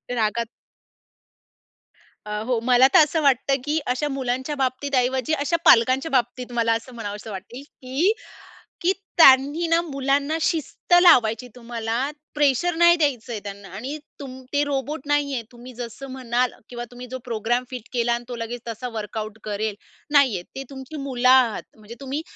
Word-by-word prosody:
रागात 230 +1 0 1.8
अ, 210 0 -3
हो 250 -2 +1
मला 250 +1 +7
तर - - +9
असं 310 +2 -1
वाटतं, 275 -1 +3
की 300 +2 0 0.2
अशा 295 +4 -2
मुलांच्या 260 +1 -2
बाबतीत 280 +2 -4
ऐवजी 260 +3 -1
अशा 335 +3 +1
पालकांच्या 255 +6 +5
बाबतीत 250 -1 -1
मला 230 -1 +2
असं 235 +3 -6
म्हणावसं 210 -1 -6
वाटेल, 210 +7 -8 0.2
की 270 +9 0 0.7
की 355 +2 +3 0.2
त्यांनी 290 +2 +6
ना 335 0 +4
मुलांना 280 0 0
शिस्त 325 +2 -2
लावायची 235 -8 +5
तुम्हाला, 230 -1 -4 0.4
प्रेशर 295 +4 +2
नाही 345 +1 +6
द्यायचंय 245 -8 -1
त्यांना 200 -1 -8
आणि 265 +8 -5 0.2
तुम 260 -2 -8
ते 290 0 +2
रोबोट 285 +1 -3
नाहीये. 285 -4 0
तुम्ही 245 +1 -12
जसं 240 +3 -7
म्हणाल 250 -1 0 0.2
किंवा 240 -1 -6
तुम्ही 245 +1 -9
जो 260 +1 -6
प्रोग्राम 240 +1 -1
फिट 250 -4 -8
केला 235 -1 +1
आणि 240 0 -2
तो 245 - -5
लगेच 235 +1 -5
तसा 230 +2 -5
वर्कआउट 215 0 -5
करेल, 210 0 -2 0.4
नाहीये. 260 -11 +4
ते 270 - -5
तुमची 270 +2 -9
मुलं 255 -2 0
आहात, 255 -4 +5 0.2
म्हणजे 215 +2 -11
तुम्ही 275 +3 -4
255 Hz, 155 wpm, -23 LUFS, 230-280 Hz, 1.8 s, तर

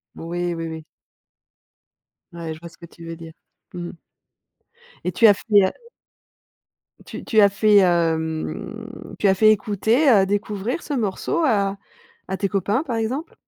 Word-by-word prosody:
Oui, 175 +1 -3
oui, 165 0 -4
oui. 160 -1 -7 1.5
Ouais, 165 -2 -5
je 155 - -12
vois 170 0 -10
ce - - -21
que 170 - -12
tu 170 0 -14
veux 165 0 -6
dire. 165 -1 -11 0.4
Mmh 175 -1 -5
mh. 165 - -13 1.0
Et 180 - -1
tu 225 +6 +5
as 205 - +8
fait - - -11
la 200 -2 +5 1.3
tu - - -8
tu 220 - +2
as 200 -1 +7
fait, 205 +1 +3
hem, 175 +6 -1
tu 205 - +2
as 190 - +5
fait 215 +2 +6
écouter, 220 +7 +2
heu, 200 -5 +5
découvrir 205 - -2
ce 295 - -5
morceau 230 - -1
à 200 -5 +1 0.5
à 190 - -3
tes 200 -2 -1
copains, 200 - 0
par 235 -7 -3
exemple? 255 +9 -3
195 Hz, 165 wpm, -22 LUFS, 170-220 Hz, 1.5 s, as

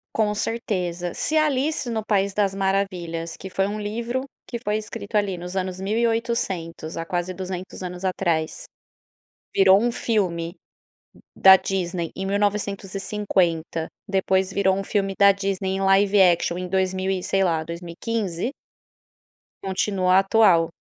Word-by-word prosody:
Com 210 -1 +1
certeza. 180 -6 -2
Se 315 - -1
Alice 295 -2 +1
no 220 -2 -2
País 200 -2 +1
das 200 -2 +1
Maravilhas, 185 -4 -2
que 190 - -9
foi 195 +1 0
um 210 +1 -4
livro 235 +5 -2 0.3
que 235 - -5
foi 210 -3 -1
escrito 215 0 -7
ali 200 -4 +1
nos 180 +2 -7
anos 185 -1 -2
1800, 215 -7 -1
há 165 - -2
quase 175 +1 -2
200 185 0 -6
anos 180 0 -5
atrás, 175 - -1 0.9
virou 195 0 +6
um 240 - +2
filme 185 -8 -1 0.8
da 190 0 +9
Disney 175 -3 -2
em 190 - -3
1950, 195 -4 -1 0.2
depois 190 -1 +1
virou 190 -1 +2
um 195 - -2
filme 195 -1 -1
da 200 0 +8
Disney 195 -1 -2
em 190 - -2
live 195 +1 +4
action 175 -1 +3
em 180 0 -4
dois 190 0 0
mil 190 0 -1
e, 190 -1 -1
sei 195 +1 +1
lá, 165 -3 +1
2015 175 +5 -3 1.1
continua 190 -1 +2
atual. 195 -5 +4
195 Hz, 140 wpm, -23 LUFS, 180-210 Hz, 1.1 s, da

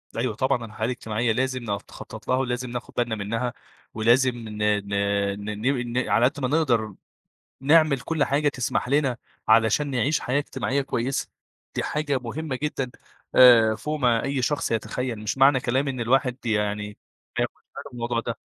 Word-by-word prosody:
أيوه 115 -2 -1
طبعًا، 130 -2 0
الحياة 110 0 -4
الاجتماعية 115 -1 -1
لازم 130 +1 -1
ن - - -8
نخطّط 100 -2 -7
لها 130 - +2
ولازم 125 -1 -2
ناخد 120 - -6
بالنا 120 -2 0
منّها، 115 +4 -2 0.4
ولازم 120 +4 +4
ن 110 -3 -8
ن 105 -1 +1 0.6
ن 105 0 -5
ن 125 -2 0
ن - - -7
على 120 - +4
قد 145 +3 0
ما 130 - 0
نقدر 120 - +1 0.7
نعمل 150 -1 +4
كل 155 +1 0
حاجة 145 +2 +1
تسمح 125 -2 -1
لنا 140 -2 +2 0.3
علشان 115 +6 +4
نعيش 135 +4 +1
حياة 130 +3 0
اجتماعية 140 -1 -1
كويسة. 130 0 -2 0.5
دي - - -1
حاجة 150 -2 -1
مهمة 130 +4 -4
جدًا 135 -4 -2 0.4
آآ 115 -3 +8
فوق 150 +6 -4
ما 120 -3 +2
أي 140 -1 -1
شخص 145 +4 0
يتخيّل، 115 +2 -2
مش 105 +4 -3
معنى 135 -1 +6
كلامي 130 +3 0
إن 130 -2 -5
الواحد 125 +1 +1
يعني 105 -1 -1 0.4
فياخد - - 0
باله - - -12
من - - -11
الموضوع 120 -1 -2
ده. 115 -1 -4
125 Hz, 170 wpm, -25 LUFS, 115-135 Hz, 0.7 s, آآ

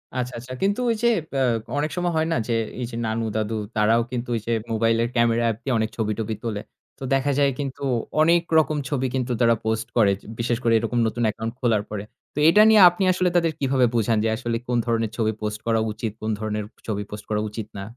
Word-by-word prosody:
আচ্ছা, 125 0 -2
আচ্ছা। 130 +2 -9
কিন্তু 200 +4 +1
ওই 230 - +2
যে - - +5 0.3
অ্যা 135 - 0 0.4
অনেক 150 +1 -1
সময় 175 -1 0
হয় 160 - +1
না - - +1
যে 120 - 0 0.3
এই - - -1
যে - - -7
নানু-দাদু 110 -1 -2 0.2
তারাও 110 +2 +3
কিন্তু 120 0 -4
ওই - - 0
যে - - 0 0.2
মোবাইলের 115 +1 +2
ক্যামেরা 115 0 +3
অ্যাপ 110 - -1
দিয়ে 135 - -1
অনেক 110 0 0
ছবি 110 -1 0
টবি 110 0 -2
তোলে। 105 -3 -3 0.4
তো - - -8
দেখা 135 +1 +2
যায় 140 -1 +4
কিন্তু 140 -1 -4 0.4
অনেক 170 +2 +5 0.2
রকম 155 -1 +2
ছবি 130 -3 0
কিন্তু 125 -1 -1
তারা 115 0 +5
পোস্ট 110 0 -1
করে। 100 -3 +5
য - - -28 0.2
বিশেষ 120 0 0
করে 115 -1 +3
এরকম 120 +2 -1
নতুন 120 +2 -2
অ্যাকাউন্ট 115 +2 -2
খোলার 115 -5 +1
পরে। 105 -1 -4 0.3
তো - - -20
এইটা 210 +6 +7
নিয়ে 215 -2 +7
আপনি 175 +3 -3
আসলে 185 0 +1
তাদের 165 -2 +3
কিভাবে 135 -2 +2
বুঝান 115 -1 +2
যে 110 - +1
আসলে 115 0 -3
কোনো 120 -1 +1
ধরনের 115 -2 0
ছবি 110 -1 +1
পোস্ট 105 0 -3
করা 115 -1 +2
উচিত, 110 0 -4
কোনো 110 0 -1
ধরনের 105 -1 -2 0.2
ছবি 105 -1 -2
পোস্ট 105 0 -8
করা 105 0 0
উচিত 110 0 -6
না? 100 - -5
115 Hz, 225 wpm, -23 LUFS, 110-135 Hz, 0.4 s, এইটা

